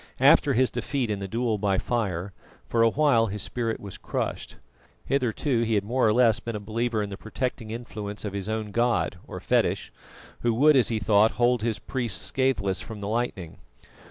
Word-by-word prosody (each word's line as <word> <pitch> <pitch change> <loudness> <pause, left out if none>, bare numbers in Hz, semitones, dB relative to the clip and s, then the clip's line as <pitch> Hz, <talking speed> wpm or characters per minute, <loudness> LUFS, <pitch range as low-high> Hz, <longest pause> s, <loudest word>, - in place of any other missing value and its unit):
After 140 +1 +5
his 130 +1 +2
defeat 130 -6 -2
in 100 - -2
the 100 - -4
duel 115 +1 -1
by 100 -1 +1
fire, 100 -6 -2 0.3
for 115 - +1
a 115 - +6
while 130 -4 +3
his 105 -1 -4
spirit 115 -2 -2
was 100 -2 -9
crushed. - - -4 0.5
Hitherto 130 -1 0
he 115 -1 +1
had 100 - +1
more 120 +3 +1
or - - +4
less 115 -1 +4
been 115 -1 -5
a - - -3
believer 110 +1 -1
in 100 - -6
the 100 - -6
protecting 115 +1 -4
influence 110 -3 -6
of 100 - -4
his 100 +1 -3
own 110 -1 -3
god 120 -5 0
or - - -7
fetish, - - 0 0.5
who 120 -1 +1
would, 150 +5 +5
as 130 - +4
he 115 - 0
thought, 105 +1 +3
hold 120 0 +2
his 115 -1 -1
priests 120 -7 -2
scatheless 130 -9 0
from 110 -2 -8
the 100 - -5
lightning. 105 -7 -3
115 Hz, 195 wpm, -26 LUFS, 105-120 Hz, 0.5 s, a